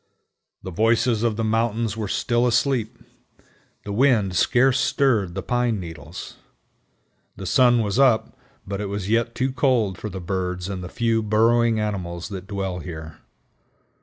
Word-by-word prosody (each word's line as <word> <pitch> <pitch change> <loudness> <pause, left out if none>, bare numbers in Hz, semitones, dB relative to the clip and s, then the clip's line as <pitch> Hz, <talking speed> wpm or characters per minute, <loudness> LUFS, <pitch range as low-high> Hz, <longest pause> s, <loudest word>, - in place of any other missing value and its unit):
The 95 - -6
voices 115 +3 +2
of 115 -2 +1
the 115 - -2
mountains 110 0 0
were 110 -2 -3
still 120 +4 +1
asleep. 120 -1 0 0.9
The 100 - -6
wind 105 -5 +2
scarce 130 +6 +3
stirred 110 -13 +1
the 95 - -4
pine 120 -1 0
needles. 80 -1 -9 1.0
The 95 - -8
sun 120 +3 +4
was 105 +4 -1
up, 115 -5 +3 0.3
but 100 +1 -4
it 105 - -3
was 100 0 -4
yet 115 +1 +1
too 130 +1 0
cold 125 -8 +1
for 105 - -5
the 95 - -6
birds 90 0 -3
and 95 -2 -5
the 90 - -6
few 115 +1 0
burrowing 115 +1 +3
animals 90 -5 -3
that 95 -2 -7
dwell 95 -3 -3
here. 80 -3 -8
110 Hz, 155 wpm, -23 LUFS, 95-120 Hz, 1.0 s, sun